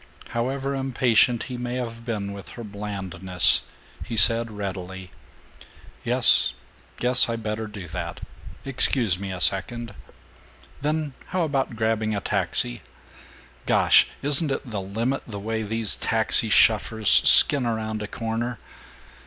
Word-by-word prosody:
However 135 +4 -3
impatient 125 -3 +1
he 125 -2 -7
may 120 0 -5
have 115 -2 -6
been 105 -4 -4
with 100 -1 -11
her 120 - -7
blandness 95 -4 +1 0.4
he 115 - -6
said 115 +2 +6
readily: 95 -3 -7 0.9
"Yes, - - +3 0.4
guess 125 0 +4
I 115 - -2
better 110 0 -5
do 100 -4 -10
that. - - -6 0.5
Excuse 120 -7 +1
me 100 -1 -6
a 90 - -6
second. 115 +5 0 0.9
Then 150 0 -2
how 185 -1 -2
about 135 -6 -2
grabbing 110 -1 -1
a - - -2
taxi - - -1 0.9
(Gosh, - - +4 0.2
isn't 145 +2 +3
it 135 0 -4
the 105 -2 -4
limit 115 +8 -3
the 105 -3 -8
way 110 +2 -4
these 110 0 +1
taxi 110 0 +1
shuffers 110 +2 +3
skin 135 -4 +6
around 110 -1 -4
a 105 - -5
corner? 115 +2 -4
110 Hz, 130 wpm, -23 LUFS, 100-125 Hz, 0.9 s, said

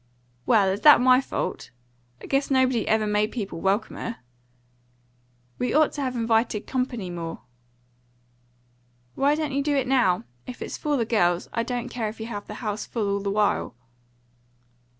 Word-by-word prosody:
"Well, 210 -5 +4
is 195 +2 -2
that 295 -1 +8
my 255 +1 +5
fault? - - -4 0.5
I - - -6
guess 275 +1 0
nobody 260 -4 +2
ever 220 0 +2
makes 210 +2 0
people 195 -8 -4
welcomer." 215 +4 -1 1.4
"We 250 - -1
ought 310 0 +4
to 290 - -5
have 255 -2 -2
invited 225 -2 +1
company 245 -8 -3
more." 165 -1 -6 1.7
"Why 280 +2 +2
don't 305 -1 -2
you 280 - +1
do 290 0 0
it 270 -2 +1
now? 245 - +2 0.2
If 250 - -6
it's - - -6
for 295 -1 -1
the 230 - 0
girls, 175 -6 +1
I 230 - 0
don't 245 +1 -3
care 230 -3 -3
if 220 - -11
you 220 - -5
have 205 -3 -6
the 210 - -7
house 210 0 -3
full 210 -4 -1
all 200 - 0
the 200 0 -3
while." 205 - 0
230 Hz, 170 wpm, -25 LUFS, 205-260 Hz, 1.7 s, that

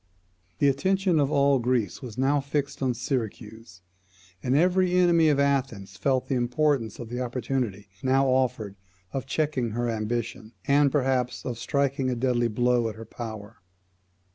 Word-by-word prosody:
The 145 - +3
attention 185 +4 +2
of 140 -2 +2
all 140 -2 +3
Greece 120 -4 -1
was 120 -5 -8
now 135 +3 +2
fixed 140 0 -3
on 130 -2 0
Syracuse; 115 -5 -5 0.6
and 125 +5 0
every 180 +2 +3
enemy 170 -3 +4
of 145 -2 +2
Athens 130 -9 0
felt 130 +7 0
the - - -1
importance 125 -2 0
of 120 -2 -8
the 125 +1 -4
opportunity 120 -5 -3
now 135 +1 +3
offered 125 -6 0 0.4
of 135 -1 -4
checking 135 -7 -1
her 120 0 0
ambition, 115 0 -3
and, 140 0 +4
perhaps, 130 -3 0
of 120 -2 -4
striking 140 0 0
a 125 - -1
deadly 120 -1 +1
blow 120 +1 +1
at 110 - -8
her 115 +1 -9
power. 110 -4 -8
125 Hz, 155 wpm, -26 LUFS, 115-140 Hz, 0.6 s, enemy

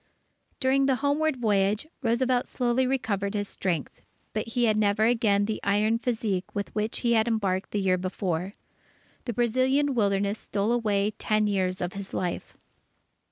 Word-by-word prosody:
During 270 +1 +3
the 265 - +3
homeward 300 +1 +2
voyage, 210 -1 +1 0.2
Roosevelt 245 +1 +1
slowly 250 +1 +1
recovered 215 -6 -1
his 205 -1 -1
strength, 175 -8 -3 0.3
but 215 +1 -2
he 240 +1 -1
had 215 -2 +3
never 205 +1 +2
again 220 -4 +3
the 215 0 -2
iron 210 +3 +2
physique 220 -6 -2
with 200 0 -3
which 215 +1 -1
he 235 -1 +2
had 220 0 +3
embarked 200 -5 0
the 205 - -1
year 185 -1 +2
before. 185 0 -2 0.7
The 240 - -2
Brazilian 255 +5 +2
Wilderness 200 -2 +1
stole 205 +2 -1
away 210 -3 +1
ten 215 0 +1
years 185 -3 0
of 180 0 -2
his 195 -1 -7
life. 180 -2 -3
215 Hz, 160 wpm, -27 LUFS, 200-240 Hz, 0.7 s, During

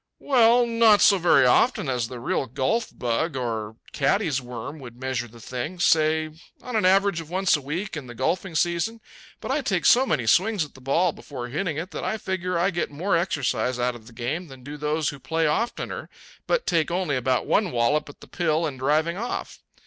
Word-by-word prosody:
"Well, 245 -2 +4
not 230 -3 +5
so 200 -2 +6
very 150 -6 +5
often, 205 - +3
as 125 -3 -1
the 125 0 -8
real 130 +2 -1
golf 135 - 0
bug 125 +6 -2
or 110 -4 -3 0.2
caddie's 150 -1 +1
worm 125 +5 -7
would 120 -2 -11
measure 130 -2 -2
the 115 +1 -15
thing 130 +10 -5
say, 155 -1 +2 0.3
on 250 -2 -5
an 215 - +2
average 195 -2 +3
of 160 - -12
once 185 0 +2
a 150 - -3
week 165 +8 -4
in 145 -5 -6
the 120 - -9
golfing 165 +7 -1
season. 175 +8 0 0.4
But - - -4
I 290 +2 +1
take 190 -9 -1
so 260 +2 +6
many 120 - 0
swings 190 - +3
at 145 - -16
the 130 - -15
ball 165 +7 +2
before 125 -5 -8
hitting 155 +3 -2
it 170 +4 -5
that - - -5
I 220 - -1
figure 185 -3 -2
I 185 +4 +2
get 175 -1 -2
more 170 +7 -1
exercise 130 -8 0
out 125 0 0
of 115 -2 -13
the 120 - -14
game 140 +10 -3
than 135 -3 -13
do 145 +3 -7
those 150 +1 -1
who 140 - -8
play 165 +4 -1
oftener 160 +11 -2 0.4
but - - +1
take 165 -4 +1
only 175 -4 -1
about 130 0 0
one 210 -3 +2
wallop 145 +4 +1
at 145 - -14
the - - -13
pill 165 -2 0
in 145 -4 -4
driving 155 +6 +1
off. 235 +4 -5
155 Hz, 210 wpm, -24 LUFS, 130-185 Hz, 0.4 s, so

